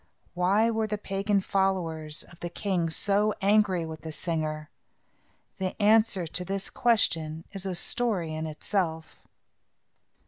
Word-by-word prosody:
Why 195 +6 +3
were 220 -1 0
the 210 0 -2
pagan 195 0 0
followers 170 -6 -1
of 170 - -17
the 175 - -4
king 180 -2 -1
so 205 +5 +1
angry 195 -4 +3
with 160 -1 -8
the 160 - -6
singer? 155 -2 -3 0.9
The 185 +2 -3
answer 210 -3 +4
to 180 +3 -2
this 195 +2 -2
question 165 -10 +2
is 195 -1 -5
a 185 - -2
story 185 -6 +1
in 160 0 -3
itself. 160 0 -2
185 Hz, 135 wpm, -28 LUFS, 160-205 Hz, 0.9 s, answer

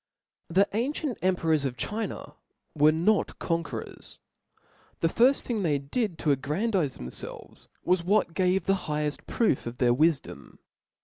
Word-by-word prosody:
The 190 +4 +3
ancient 260 +4 -2
emperors 165 -5 +2
of 130 -3 -3
China 220 - -4 0.4
were 150 0 +5
not 175 +7 +1
con 170 -1 0
querors. - - -8 0.8
The 165 - +4
firft 245 +10 +4
thing 230 -4 -2
they 155 -6 +1
did 170 - -2
to 150 -3 +2
a^randize 150 - -1
rhemfelves, 60 +1 -7 0.2
was 180 -1 +2
what 200 -1 +2
gave 185 +1 +2
the 195 - +2 0.2
higheft 150 -1 -2
proof 215 - +1
of 120 +1 -6
their 120 -2 +3
wifdom. 155 +2 0
170 Hz, 140 wpm, -27 LUFS, 150-210 Hz, 0.8 s, were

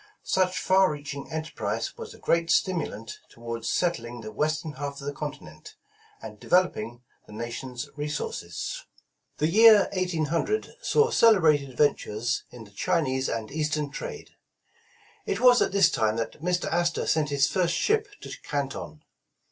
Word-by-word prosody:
Such 185 -1 +1
far 190 -1 +4
reaching 145 0 -7
enterprise 160 0 -3
was 465 -1 -9
a - - -15
great 170 0 +1
stimulant 150 - -1
toward 115 -1 -7
settling 120 -9 -1
the 110 -1 -7
western 155 +6 -1
half 140 0 -6
of 140 - -9
the 145 - -3
continent, 145 +1 -8 0.5
and - - -9
develop 180 0 +3
ing 120 +3 -7 0.2
the - - -12
nation's 120 +2 -5
resources. 145 - -4 0.5
The 150 - +1
year 215 +5 +7
1800 180 - -1
saw 465 -1 +3
celebrated 155 - +4
ventures 120 -4 0
in 120 -2 -11
the 100 - -16
Chinese 130 - 0
and 110 -2 -4
Eastern 150 -1 -1
trade. - - -7 1.0
It 195 - -1
was 245 0 +6
at - - +2
this 195 -3 +4
time 110 -1 +1
that 115 +5 -4
Mr. 180 +1 0
Astor 175 0 +1
sent 155 -2 +1
his 140 -1 +3
first 175 -3 +1
ship 435 - +1
to - - -8
Canton. - - -4
150 Hz, 150 wpm, -26 LUFS, 125-180 Hz, 1.0 s, year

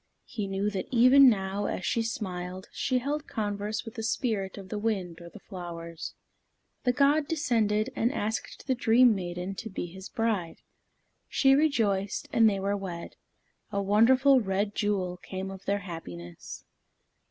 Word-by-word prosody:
He 210 -3 -4
knew 195 +2 -1
that 190 -2 -3
even 255 +2 +7
now, 195 -2 -1
as 185 - -3
she 230 - +1
smiled, 185 -5 -4
she 255 - 0
held 290 +4 -2
converse 210 0 -3
with 225 - -8
the 225 - -5
spirit 220 -4 -1
of 195 -2 -9
the 210 - -3
wind 190 -6 -2
or 170 - -10
the 215 - -12
flowers. 170 -4 -7 0.7
The 250 - +4
god 285 +3 +3
descended 225 -9 +1
and 235 +2 +1
asked 220 -4 -4
the 265 - +2
dream 240 0 +5
maiden 180 0 -4
to 220 +3 -6
be 190 - -4
his 190 +2 -9
bride. 220 -8 -1 0.7
She 270 -1 +4
rejoiced, 220 -10 +1
and 225 -1 +6
they 200 -2 -1
were 200 +1 0
wed. 180 -4 -6 0.6
A 200 - -1
wonderful 255 +7 +5
red 200 0 -1
jewel 190 -4 -1
came 190 +1 -6
of 195 0 -10
their 200 +1 0
happiness. 85 - -8
205 Hz, 160 wpm, -28 LUFS, 190-230 Hz, 0.7 s, even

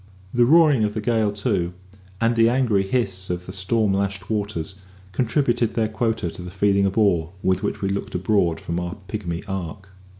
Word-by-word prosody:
The 120 0 +4
roaring 150 -4 +5
of 105 -1 -1
the - - -1
gale, 110 -2 +1
too, 100 -4 -1 0.5
and 115 +1 +2
the 115 0 +5
angry 120 -5 +2
hiss 95 -3 -2
of 90 0 -3
the 95 - -8
storm 100 +2 +1
lashed 95 0 -2
waters, 100 -4 -3 0.3
contributed 120 +2 +1
their 110 -2 +1
quota 110 -5 -1
to - - -9
the 90 - -7
feeling 100 +1 +2
of 95 - -4
awe 90 -7 +3
with 95 0 +2
which - - -3
we 95 - +1
looked 100 -1 -3
abroad 90 -2 +1
from 85 +1 -3
our 90 0 -4
pigmy 95 -5 -4
ark. 95 0 -5
100 Hz, 190 wpm, -23 LUFS, 95-115 Hz, 0.5 s, roaring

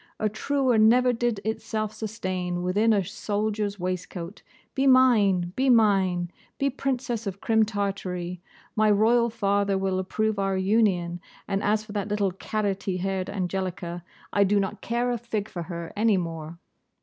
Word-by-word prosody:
A 215 - +1
truer 255 +2 +1
never 245 +3 +5
did 235 -2 0
itself 220 -1 -2
sustain 185 -5 -3
within 205 +5 +2
a 200 -3 +2
soldier's 205 +1 -2
waistcoat. 180 0 -5 0.3
Be 275 +1 +1
mine! 210 -9 +4
Be 265 +1 +2
mine! 190 -7 +3 0.3
Be 275 0 +1
Princess 245 -4 -2
of 195 0 -4
Crim 220 0 +3
Tartary! 185 -4 -3 0.3
My 215 0 +3
Royal 230 +3 +4
father 200 -2 +1
will 190 -1 0
approve 215 +2 -1
our 195 -1 0
union; 190 -4 +1 0.3
and, 195 0 -1
as 215 +1 +1
for 215 - -10
that 205 -1 -2
little 205 -2 0
carroty 195 -1 -2
haired 190 0 -2
Angelica, 185 -3 -3 0.3
I 200 - +4
do 200 +1 +3
not 195 -1 -3
care 240 +1 0
a 240 - -2
fig 220 -3 -3
for 175 - -6
her 170 -1 -6
any 215 -1 +3
more. 165 -2 -5
205 Hz, 155 wpm, -26 LUFS, 185-220 Hz, 0.3 s, never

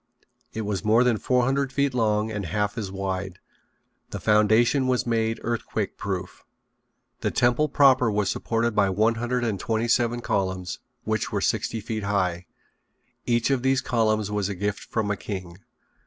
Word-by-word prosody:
It 110 - -4
was 105 -2 -3
more 110 +3 +4
than 120 -3 +2
four 125 -1 +2
hundred 135 +1 0
feet 140 -1 0
long 110 -2 +1
and 100 -4 -4
half 105 +3 -1
as 105 -5 -4
wide. 95 -1 -4 0.7
The - - -5
foundation 110 +5 +3
was 125 -1 +1
made 115 -1 0
earthquake 115 -3 -2
proof. 95 -2 -5 0.8
The - - 0
temple 125 +5 +2
proper 135 -4 +5
was 105 -2 0
supported 115 +3 0
by 100 -2 +3
one 110 +4 +2
hundred 120 +1 -1
and 110 -5 -1
twenty 115 +3 -1
seven 120 0 +2
columns 95 -6 -2 0.2
which - - -1
were - - 0
sixty 115 - -1
feet 110 0 -4
high. 95 -3 -1 0.8
Each 120 +2 +2
of 135 -2 +1
these 130 0 +2
columns 110 -4 0
was 105 -1 -1
a 100 - -3
gift 100 +2 -2
from 110 -2 -1
a - - 0
king. 90 0 -7
110 Hz, 170 wpm, -25 LUFS, 100-120 Hz, 0.8 s, proper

